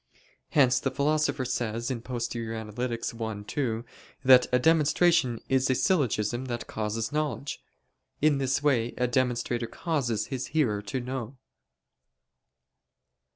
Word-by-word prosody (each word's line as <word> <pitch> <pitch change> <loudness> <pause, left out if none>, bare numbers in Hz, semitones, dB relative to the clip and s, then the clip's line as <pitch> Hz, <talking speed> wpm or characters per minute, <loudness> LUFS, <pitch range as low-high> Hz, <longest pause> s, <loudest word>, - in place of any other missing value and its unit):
Hence 130 -4 +4
the 135 - -1
Philosopher 145 0 0
says 120 -1 -2
(Poster. 115 -2 -3
i, 115 -1 -4
2) 120 -4 -2 0.4
that 130 -1 +7
"a 125 - +5
demonstration 150 -3 +3
is 130 0 +2
a 130 - +3
syllogism 130 - +1
that 120 -2 -4
causes 110 +2 -3
knowledge." 150 -1 -2 0.6
In 150 -2 +3
this 135 +1 0
way 120 -5 +1
a 125 - +2
demonstrator 120 -1 0
causes 120 - -1
his 130 0 -3
hearer 110 -9 +2
to 105 +5 -4
know. 130 0 -5
125 Hz, 115 wpm, -28 LUFS, 115-140 Hz, 0.6 s, that